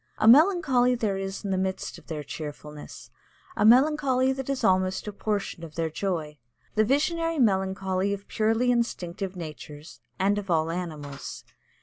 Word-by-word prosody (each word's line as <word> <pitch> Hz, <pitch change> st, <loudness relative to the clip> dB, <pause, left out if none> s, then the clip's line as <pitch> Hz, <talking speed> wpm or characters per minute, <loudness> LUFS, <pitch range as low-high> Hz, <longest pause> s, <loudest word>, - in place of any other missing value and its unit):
A 215 Hz, -, +2 dB
melancholy 270 Hz, -, +5 dB
there 210 Hz, -5 st, -1 dB
is 195 Hz, +1 st, -5 dB
in 195 Hz, -, -2 dB
the 190 Hz, -, +1 dB
midst 190 Hz, 0 st, -3 dB
of -, -, -23 dB
their 155 Hz, -3 st, -5 dB
cheerfulness 150 Hz, 0 st, -9 dB, 0.4 s
a -, -, +1 dB
melancholy 260 Hz, +2 st, +4 dB
that 265 Hz, 0 st, -6 dB
is 275 Hz, -1 st, -2 dB
almost 185 Hz, +1 st, +1 dB
a 210 Hz, -, -4 dB
portion 200 Hz, -4 st, -3 dB
of 160 Hz, -2 st, -9 dB
their 165 Hz, -1 st, -1 dB
joy, 160 Hz, -5 st, -3 dB, 0.3 s
the 215 Hz, -, +3 dB
visionary 330 Hz, +7 st, +1 dB
melancholy 190 Hz, -4 st, +1 dB
of 200 Hz, 0 st, -5 dB
purely 225 Hz, +3 st, +1 dB
instinctive 195 Hz, -5 st, -2 dB
natures 155 Hz, -2 st, -9 dB, 0.2 s
and 200 Hz, +2 st, +2 dB
of 195 Hz, -2 st, -9 dB
all 165 Hz, -1 st, +1 dB
animals. 155 Hz, -5 st, -6 dB
195 Hz, 155 wpm, -26 LUFS, 170-245 Hz, 0.4 s, melancholy